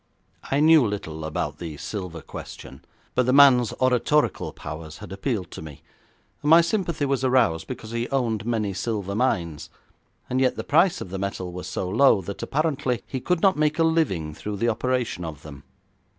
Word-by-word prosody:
I 140 +2 +2
knew 160 -2 +7
little 100 -8 -4
about 75 -1 -3
the 80 -4 -6
silver 90 -2 -6
question, 70 -3 -10 0.3
but 125 -1 +1
the 125 - +3
man's 130 -5 +6
oratorical 130 +4 +1
powers 80 0 -8
had 105 -4 -10
appealed 95 -2 -3
to - - -8
me, 75 -3 -11 0.6
and 150 - -1
my 165 +2 +8
sympathy 170 -4 -1
was 135 -1 0
aroused 125 -11 +2
because 110 - -7
he 115 +1 -2
owned 120 -6 0
many 110 -3 -1
silver 100 0 -3
mines, 85 -10 -1 0.6
and 130 +1 0
yet 130 - +2
the - - -4
price 170 +4 +3
of 90 - -7
the 95 - -4
metal 95 -2 -4
was 90 +1 -7
so 90 0 -3
low 110 +3 +4
that 100 +2 -7
apparently 140 -5 -1
he 130 - -4
could 180 +5 0
not 195 -4 +4
make 155 0 +2
a 165 - +3
living 135 - +1
through 105 +6 -5
the 115 +4 +1
operation 125 -4 -1
of 80 -3 -7
them. 70 -3 -10
115 Hz, 185 wpm, -24 LUFS, 90-135 Hz, 0.6 s, my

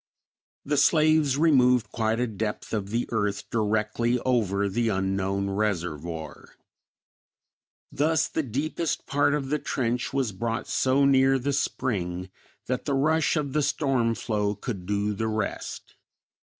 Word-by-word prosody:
The 145 +1 0
slaves 155 -1 +4
removed 125 -6 +4
quite 110 0 0
a 125 - +2
depth 110 -1 -4
of 100 -3 -2
the 115 +3 -1
earth 105 -3 -1
directly 110 +2 +1
over 100 -6 +1
the 115 +3 0
unknown 95 0 -1
reservoir; 85 -6 -3 1.4
thus 155 +2 +1
the - - -1
deepest 150 +5 -2
part 145 +1 +2
of 135 -3 -3
the 150 +1 0
trench 125 -1 -2
was 135 -5 0
brought 115 +4 -3
so 135 +2 +2
near 135 0 +4
the 140 +2 -1
spring 90 -9 -2 0.3
that 125 0 -2
the 140 - 0
rush 155 +5 +2
of 145 -4 -2
the 150 - +2
storm 135 -5 +1
flow 105 -1 -1
could 100 -4 -6
do 105 +1 0
the 110 +2 -2
rest. 110 -1 -4
115 Hz, 135 wpm, -26 LUFS, 100-140 Hz, 1.4 s, slaves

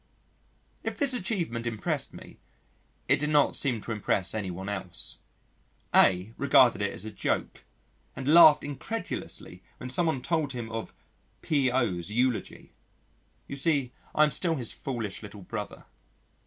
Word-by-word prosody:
If - - -4
this 280 -2 +3
achievement 175 - -2
impressed 110 -3 -2
me - - -13 0.7
it - - +4
did 150 +1 -1
not 150 -1 +3
seem 125 -6 0
to 115 - -6
impress 100 -3 0
anyone 95 -3 -4
else. 95 -10 -3 0.7
A 95 +4 +4
regarded 130 -6 +5
it 100 - 0
as 100 - -7
a 110 - -5
joke 105 - -2 0.5
and 130 0 -6
laughed 155 -1 +8
incredulously 165 +10 -6 0.2
when 125 - -6
someone 160 -3 0
told 155 -5 0
him 115 -2 -5
of 115 0 -5 0.5
"P.O.'s" 125 - +1
eulogy. 125 +2 -1 0.7
You - - -6
see 140 -3 +1 0.2
I 155 - +6
am 150 - +3
still 165 +1 +1
his 120 -6 -3
foolish 115 -7 -5
little 105 -2 -10
brother. 105 +2 -6
125 Hz, 140 wpm, -28 LUFS, 105-150 Hz, 0.7 s, laughed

